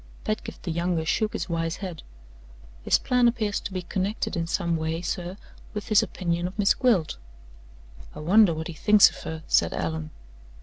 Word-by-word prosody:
Pedgift 215 - -4
the 175 - -3
younger 170 -1 -1
shook 215 +6 0
his - - -3
wise 165 -1 -2
head. 180 -6 -7 0.8
"His - - +3
plan 250 -1 +2
appears 215 -3 0
to - - -6
be 185 -1 -4
connected 195 +4 -2
in 165 -1 -2
some 170 -1 0
way, 160 +1 -2
sir, 180 +2 -4 0.4
with 210 - -5
his 215 - +6
opinion 175 -1 -2
of 185 - -10
Miss 205 -1 +4
Gwilt." 215 - +1 1.0
"I - - -7
wonder 195 +4 +5
what 160 +1 -4
he 170 - -6
thinks 210 +5 +6
of - - -12
her?" 160 0 -6
said - - +2
Allan. 160 -1 -3
180 Hz, 180 wpm, -26 LUFS, 165-210 Hz, 1.0 s, his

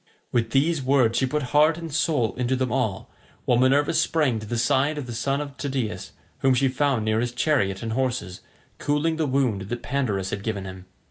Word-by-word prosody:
With 115 -2 +1
these 145 +5 +2
words 130 -4 +3
she 130 - +1
put 150 +3 -1
heart 155 +2 +5
and 165 -3 -7
soul 145 -7 +1
into 125 +1 -1
them 130 -2 -1
all, 110 -6 -2 0.3
while 120 - +3
Minerva 135 +3 +3
sprang 155 -7 +1
to 110 - -8
the 120 - -2
side 140 +5 +2
of 145 - -4
the 120 - -6
son 135 +5 -1
of 145 -2 -6
Tydeus, 130 -6 -3 0.3
whom 135 -1 +3
she 135 +1 +2
found 130 -4 0
near 110 0 +1
his 120 +1 -1
chariot 120 -7 0
and 115 -1 -3
horses, 120 -7 -2 0.4
cooling 150 +3 0
the 160 -2 0
wound 120 -8 0
that 120 0 -4
Pandarus 105 -9 -1
had 100 - -3
given 100 -2 -3
him. 95 0 -9
130 Hz, 205 wpm, -24 LUFS, 115-145 Hz, 0.4 s, heart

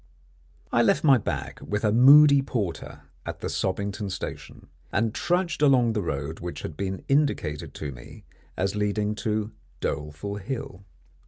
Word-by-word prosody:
I 120 - +4
left 140 +7 +3
my 135 -5 +6
bag 70 -8 -4
with 105 +1 -3
a 105 - +3
moody 140 +4 +8
porter 110 -10 -4 0.2
at - - -7
the - - -3
Sobbington 100 +1 -2
Station, 95 - -7 0.3
and 110 +1 0
trudged 175 +1 0
along 125 -5 +4
the 105 - -1
road 75 -2 -4
which 90 0 -6
had 80 - -6
been 95 +2 -4
indicated 135 - 0
to 75 -2 -5
me - - -13 0.3
as 95 +3 -1
leading 105 0 0
to 110 -1 -2 0.3
Doleful 75 +8 -4
Hill. 100 -3 -6
105 Hz, 150 wpm, -26 LUFS, 90-125 Hz, 0.3 s, moody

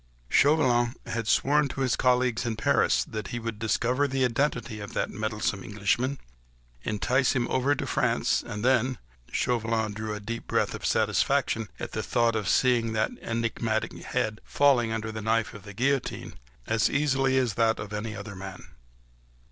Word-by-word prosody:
Chauvelin 125 -5 +3
had 115 -2 -3
sworn 145 +6 +3
to 135 - -5
his 130 -3 +2
colleagues 125 -2 +2
in 115 -2 -2
Paris 110 - +2
that 110 -1 -6
he 120 - -4
would 115 -2 -5
discover 120 +5 +1
the 135 -1 +1
identity 120 -3 -1
of 100 - -8
that - - -1
meddlesome 110 0 -2
Englishman, 110 +6 0 0.6
entice 125 - +1
him 120 -2 0
over 135 +3 +2
to - - -3
France, - - +1
and 105 +2 -5
then... 130 -1 +2 0.3
Chauvelin 115 -3 0
drew 105 0 -4
a - - -5
deep 115 +3 -6
breath - - +1
of - - -3
satisfaction 110 -2 +1
at - - -5
the - - -2
very - - -10
thought 115 -1 +3
of 105 -4 -1
seeing 120 -3 +3
that 110 0 +1
enigmatic 115 -1 -1
head 110 0 -2
falling 130 -5 +3
under 110 0 -3
the 110 0 -5
knife 110 +1 0
of 105 - -10
the 105 - -9
guillotine, 135 +3 -1 0.3
as 110 -1 +2
easily 135 -2 +2
as 125 -5 +1
that 115 0 +2
of 105 0 -7
any 110 +1 -4
other 100 0 -7
man. 95 0 -9
115 Hz, 170 wpm, -27 LUFS, 110-130 Hz, 0.6 s, Chauvelin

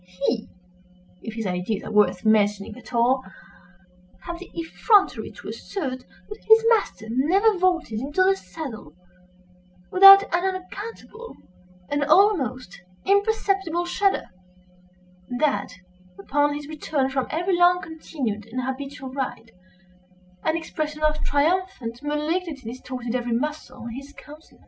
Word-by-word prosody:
He—if 180 -1 -7
his 225 -2 -4
ideas 185 +3 -2
are - - -7
worth 205 -2 +2
mentioning 210 -1 +2
at 245 -2 -13
all—had 190 - -4
the 365 - -11
effrontery 390 +5 +2
to - - -12
assert 270 -10 -5 0.3
that 420 - -10
his 445 0 +7
master 440 - +1
never 355 - +3
vaulted 345 -12 +1
into 290 +9 +1
the 385 +1 +4
saddle 245 - -9 1.0
without 390 +1 +10
an 345 -2 -1
unaccountable 405 +5 -6 0.5
and 290 0 0
almost 275 - +2 0.2
imperceptible 390 -4 +1
shudder, 390 +3 +1 1.0
and 245 - -4
that, 275 -10 +1 0.5
upon 290 +8 +1
his 295 0 -7
return 300 -3 -1
from 265 -1 -2
every 350 +4 0
long 355 +1 +5
continued 295 - -5
and 250 +3 -4
habitual 265 0 -6
ride, 255 -4 -4 0.9
an 315 +1 +1
expression 310 -2 -4
of 305 0 +1
triumphant 290 -5 0
malignity 300 -3 -2
distorted 250 -1 -6
every 245 -1 -1
muscle 295 +4 -4
in 235 - -5
his 275 +1 -10
countenance. 300 +2 -15
285 Hz, 120 wpm, -24 LUFS, 230-350 Hz, 1.0 s, without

